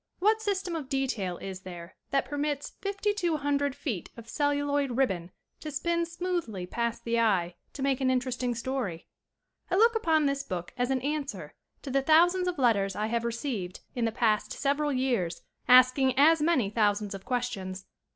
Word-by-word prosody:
What 430 +4 +3
system 385 -4 -1
of 295 -5 -5
detail 245 -10 -1
is 190 -1 -6
there 175 -2 -10
that 275 -1 +1
permits 290 0 -2
fifty 400 +1 -1
two 345 -6 0
hundred 285 -1 0
feet 225 - -4
of 230 -1 -10
celluloid 285 -2 0
ribbon 185 -10 0 0.3
to 310 - -6
spin 335 +3 -1
smoothly 335 - -3
past 235 +4 -2
the 235 0 0
eye 190 -6 +2 0.2
to 270 - -5
make 275 -1 +1
an 260 - +2
interesting 250 -1 0
story? 230 -8 -3 0.6
I 365 - +1
look 460 +4 +5
upon 320 -8 +2
this 275 0 0
book 180 -9 -5
as 245 0 0
an 265 -1 0
answer 290 +1 -3 0.3
to 275 - -5
the 275 +1 +2
thousands 350 +5 +4
of 360 - -2
letters 200 -7 +2
I 210 - -1
have 230 +1 -1
received 230 -6 -3
in 240 -2 -1
the 225 - 0
past 220 -2 +1
several 290 +1 0
years 250 -10 -1 0.2
asking 255 +1 +6
as 315 +3 +6
many 290 -11 +2
thousands 210 -1 +1
of 195 -1 -8
questions. 195 -7 -3
260 Hz, 175 wpm, -28 LUFS, 220-300 Hz, 0.6 s, asking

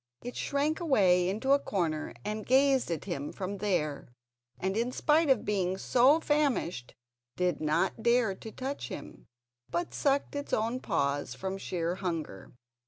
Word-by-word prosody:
It 245 - -6
shrank 290 +3 0
away 190 - +3
into 220 +8 -1
a 280 - +6
corner 165 - -2
and 215 +1 -3
gazed 265 0 +3
at 165 -3 -3
him 140 +1 -4
from 195 +1 -5
there, 165 -8 -1 0.5
and, 190 +1 -1
in 235 +3 0
spite 300 +4 +2
of 260 -5 +3
being 190 -3 0
so 260 +9 +4
famished, 280 - 0 0.4
did 180 -4 0
not 155 +8 0
dare 235 -3 +3
to 220 +3 -10
touch 270 +4 -4
him, - - -9 0.4
but 345 0 -2
sucked 280 0 0
its 285 0 -4
own 230 +3 0
paws 140 - -1
from 190 +5 -4
sheer 170 -2 -2
hunger. 165 - -4
210 Hz, 155 wpm, -30 LUFS, 180-270 Hz, 0.5 s, a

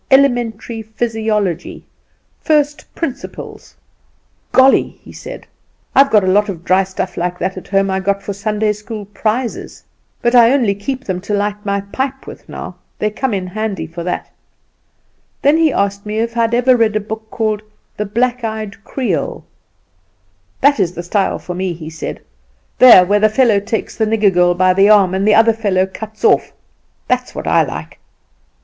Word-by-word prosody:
'Elementary 240 -4 +2
Physiology,' 220 -5 -2 0.5
'First 295 -2 +1
Principles.' 300 -7 -7 0.8
"'Golly!' 265 +1 +4
he - - -13
said; - - -9 0.5
'I've 275 0 +5
got 210 -2 +4
a - - -1
lot 205 +3 +3
of 170 -4 -6
dry 185 +1 +3
stuff 190 0 -5
like 180 +1 -2
that 185 +2 -2
at 185 - -9
home 195 0 +1
I 190 - 0
got 200 +1 -1
for 200 - -4
Sunday 210 +1 -1
school 210 0 -8
prizes; 220 +4 -3 0.4
but 240 - 0
I 240 0 +6
only 240 -8 +2
keep 260 +7 -5
them 185 -5 -3
to 205 +2 -2
light 205 0 -2
my 200 -1 -1
pipe 265 +7 -4
with - - -12
now; - - -8 0.2
they 210 - -1
come 260 +4 -2
in 190 -3 -2
handy 200 -1 -3
for 170 +1 -7
that.' 180 - -4 1.1
Then 290 +3 +4
he 325 -2 +3
asked 200 -2 -1
me 210 0 -4
if 230 +1 -1
I 235 - +1
had 230 +1 +1
ever 250 +1 +4
read 225 -3 +2
a - - +2
book 220 +1 -7
called 215 -2 -1 0.4
the 210 - -2
'Black 245 +3 0
eyed 215 -2 -5
Creole.' 240 -11 -3 1.2
'That 285 -2 +4
is 180 -3 +1
the 175 - -6
style 195 +3 0
for 180 - -7
me,' 185 0 -2
he 160 -1 -9
said; 160 - -6 0.6
'there 235 -8 +9
where 205 +3 +2
the 215 +1 +4
fellow 220 -2 +3
takes 220 +3 -4
the 220 - +2
nigger 215 -3 +2
girl 175 0 +3
by 185 +1 +3
the 195 +2 +4
arm, 200 -4 +5
and 195 +2 0
the 210 - +5
other 225 +1 +5
fellow 200 -4 +1
cuts 215 +3 -10
it - - +6
off! - - +2 0.5
That's 250 0 -1
what - - -5
I - - +3
like. - - -6
210 Hz, 180 wpm, -16 LUFS, 195-235 Hz, 1.2 s, there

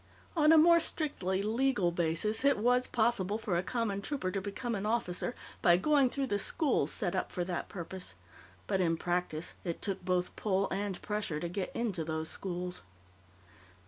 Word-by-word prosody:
On 305 -1 +5
a 325 - +8
more 335 +2 +7
strictly 195 - -2
legal 225 -4 +2
basis, 170 +7 +1
it 280 0 +4
was 245 +3 +3
possible 220 -4 +1
for 215 -5 -2
a 170 - +2
common 205 -1 -2
trooper 230 -6 -2
to 195 - -2
become 220 +5 -3
an 205 0 -2
officer 225 0 -1 0.3
by 175 -1 +6
going 280 +5 +4
through 275 +2 -1
the 205 -5 -1
schools 290 - +1
set 190 -5 -1
up 185 - -1
for 180 - -2
that 175 -1 -3
purpose, 180 - -6 0.5
but, 190 - +1
in 165 -2 +2
practice, 175 -2 -1
it 170 -2 -3
took 195 -2 -3
both 180 0 0
pull 195 -2 +1
and 195 -1 -2
pressure 210 -7 -2
to 175 - -3
get 185 +2 -3
into 210 -8 -1
those 160 0 -3
schools. 180 -1 -4
195 Hz, 175 wpm, -32 LUFS, 180-235 Hz, 0.5 s, a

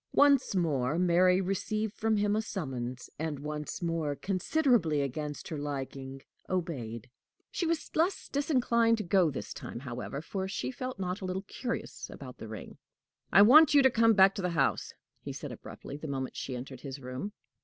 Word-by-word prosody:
Once 280 -7 +5
more 150 -5 +1
Mary 180 +1 +4
received 205 +3 -1
from 220 -1 +1
him 205 0 +2
a 215 - +1
summons, 130 - -5
and 155 -2 -2
once 150 +4 -5
more, 165 -4 -1
considerably 195 - +2
against 145 +2 -4
her 155 - -4
liking, 135 -1 -5 0.3
obeyed. 125 - -3 0.4
She 345 - -1
was 330 -1 -2
less 345 +4 +1
disinclined 240 -5 +2
to 215 - -3
go 180 -1 +3
this 115 -6 -5
time, 120 - -7
however, 130 +1 -5
for 190 +5 -4
she 195 - -3
felt 255 -1 -5
not 185 +1 -3
a - - -4
little 185 +1 -3
curious 235 +4 -5
about 125 -3 -10
the 110 - -7
ring. 110 -1 -9 0.5
"I 200 - +8
want 295 +7 +8
you 280 - +7
to 265 - +6
come 230 -1 +4
back 195 0 +7
to 195 - -4
the 180 - 0
house," 170 - +1 0.3
he - - -6
said, - - -6
abruptly, 140 - -8
the 155 - -7
moment 135 -2 -3
she 130 - -4
entered 130 +1 -7
his 135 -1 -6
room. 130 +10 -5
175 Hz, 180 wpm, -30 LUFS, 140-215 Hz, 0.5 s, I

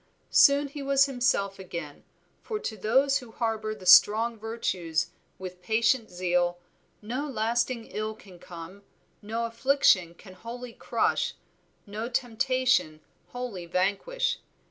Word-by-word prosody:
Soon 280 0 +6
he 285 +1 -8
was 275 0 +4
himself 245 -8 0
again, 170 -6 -7 0.4
for 435 - -4
to 225 - -4
those 265 +7 +2
who 245 -4 -12
harbor 220 -1 -2
the 195 -3 -13
strong 220 +5 +6
virtues 190 -7 -2 0.3
with 180 -1 -8
patient 225 +4 +1
zeal, 175 -1 0 0.5
no 255 +7 -3
lasting 235 -1 -1
ill 215 0 -4
can 190 -4 -16
come, 175 +3 -10 0.4
no 225 +3 -3
affliction 230 -8 +2
can 185 +1 -14
wholly 235 +5 -8
crush, - - 0 0.5
no 215 +3 -5
temptation 250 -8 +1 0.3
wholly 235 -9 -6
vanquish. 205 - 0
220 Hz, 120 wpm, -27 LUFS, 185-250 Hz, 0.5 s, Soon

